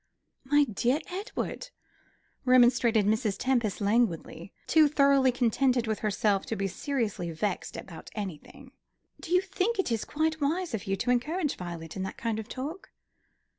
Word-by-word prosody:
"My 290 Hz, +2 st, +4 dB
dear 245 Hz, +3 st, 0 dB
Edward," 415 Hz, +5 st, -4 dB, 0.7 s
remonstrated 240 Hz, -3 st, +4 dB
Mrs. 215 Hz, -1 st, +1 dB
Tempest, 240 Hz, -6 st, 0 dB
languidly, 200 Hz, -4 st, 0 dB
too 310 Hz, -1 st, +5 dB
thoroughly 280 Hz, -2 st, +4 dB
contented 250 Hz, 0 st, +2 dB
with 220 Hz, -1 st, -2 dB
herself 205 Hz, -1 st, +1 dB
to 225 Hz, -, -2 dB
be 195 Hz, -, -2 dB
seriously 205 Hz, -3 st, -2 dB
vexed 175 Hz, +4 st, -3 dB
about 165 Hz, -4 st, -9 dB
anything, 210 Hz, -, -7 dB, 0.5 s
"do -, -, -9 dB
you 360 Hz, 0 st, +5 dB
think 400 Hz, +4 st, -1 dB
it 385 Hz, -10 st, 0 dB
is 225 Hz, -2 st, 0 dB
quite 315 Hz, +1 st, -1 dB
wise 330 Hz, +3 st, 0 dB
of 210 Hz, -3 st, -3 dB
you 195 Hz, -, +1 dB
to 220 Hz, +6 st, 0 dB
encourage 295 Hz, +6 st, 0 dB
Violet 170 Hz, -3 st, -7 dB
in 190 Hz, -, -4 dB
that 190 Hz, -, -5 dB
kind 225 Hz, -2 st, -2 dB
of 220 Hz, +1 st, -7 dB
talk?" 305 Hz, +9 st, -6 dB
240 Hz, 155 wpm, -28 LUFS, 205-285 Hz, 0.7 s, too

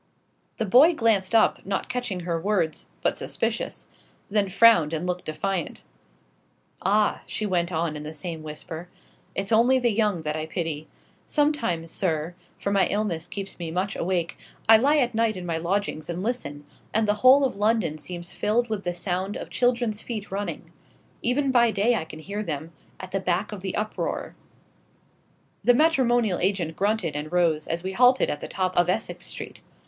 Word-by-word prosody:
The 225 Hz, -, -1 dB
boy 275 Hz, -, +6 dB
glanced 225 Hz, -5 st, +2 dB
up, 225 Hz, -, +4 dB
not 195 Hz, +1 st, -2 dB
catching 245 Hz, -7 st, -3 dB
her 170 Hz, -1 st, -2 dB
words, 185 Hz, -6 st, 0 dB, 0.2 s
but -, -, +3 dB
suspicious: -, -, -3 dB, 0.5 s
then 205 Hz, -2 st, +2 dB
frowned 190 Hz, -6 st, +5 dB
and 160 Hz, +2 st, -2 dB
looked 180 Hz, 0 st, -3 dB
defiant. 170 Hz, +3 st, -3 dB, 1.0 s
"Ah," 205 Hz, +2 st, +2 dB
she 215 Hz, -, -3 dB
went 175 Hz, -3 st, 0 dB
on 160 Hz, -2 st, -1 dB
in 150 Hz, -, -5 dB
the 150 Hz, +1 st, -6 dB
same 165 Hz, 0 st, -6 dB
whisper, 160 Hz, +3 st, -8 dB, 0.5 s
"it's 195 Hz, +2 st, -2 dB
only 240 Hz, +4 st, +5 dB
the 245 Hz, -2 st, +2 dB
young 205 Hz, -6 st, +1 dB
that 150 Hz, 0 st, -2 dB
I 155 Hz, 0 st, -3 dB
pity. 160 Hz, -2 st, -3 dB, 0.4 s
Sometimes, 230 Hz, -, 0 dB
sir 165 Hz, -2 st, -1 dB, 0.2 s
for 200 Hz, -, -2 dB
my 200 Hz, -1 st, +3 dB
illness 195 Hz, -6 st, -2 dB
keeps 195 Hz, -2 st, -7 dB
me 170 Hz, -2 st, -4 dB
much 185 Hz, +4 st, -2 dB
awake 170 Hz, -1 st, -1 dB, 0.3 s
I 225 Hz, -, +9 dB
lie 280 Hz, +7 st, +4 dB
at 245 Hz, -4 st, +2 dB
night 220 Hz, -2 st, +1 dB
in 180 Hz, -, -6 dB
my 165 Hz, -2 st, -1 dB
lodgings 175 Hz, -2 st, -2 dB
and 175 Hz, +2 st, -3 dB
listen, 145 Hz, -, -3 dB, 0.3 s
and 220 Hz, 0 st, +3 dB
the 210 Hz, -, +4 dB
whole 270 Hz, +2 st, +7 dB
of 255 Hz, -, -2 dB
London 210 Hz, -7 st, +1 dB
seems 175 Hz, +2 st, -7 dB
filled 235 Hz, +3 st, 0 dB
with 205 Hz, -2 st, -2 dB
the 175 Hz, -1 st, -2 dB
sound 185 Hz, +2 st, -2 dB
of -, -, -8 dB
children's 240 Hz, -3 st, +1 dB
feet 215 Hz, -5 st, -6 dB
running. 200 Hz, +1 st, -4 dB, 0.5 s
Even 265 Hz, +3 st, +1 dB
by 240 Hz, -2 st, +5 dB
day 215 Hz, +3 st, +2 dB
I 220 Hz, -, -1 dB
can 155 Hz, -, -10 dB
hear 200 Hz, +6 st, -5 dB
them, 160 Hz, -4 st, -4 dB, 0.3 s
at 185 Hz, 0 st, -8 dB
the 195 Hz, -, 0 dB
back 185 Hz, +3 st, -1 dB
of 205 Hz, -3 st, -7 dB
the 190 Hz, -1 st, -3 dB
uproar 215 Hz, +1 st, -3 dB, 0.7 s
" -, -, -38 dB
The 245 Hz, -, +5 dB
matrimonial 240 Hz, -, +3 dB
agent 180 Hz, -4 st, 0 dB
grunted 200 Hz, -5 st, 0 dB
and 150 Hz, +1 st, -4 dB
rose, 165 Hz, -4 st, +2 dB
as 170 Hz, +1 st, -2 dB
we 190 Hz, -, -3 dB
halted 250 Hz, +5 st, +4 dB
at 145 Hz, -, -4 dB
the -, -, -6 dB
top 185 Hz, -1 st, -2 dB
of 175 Hz, 0 st, +3 dB
Essex 185 Hz, -, -2 dB
Street. -, -, -7 dB
195 Hz, 185 wpm, -25 LUFS, 170-225 Hz, 1.0 s, I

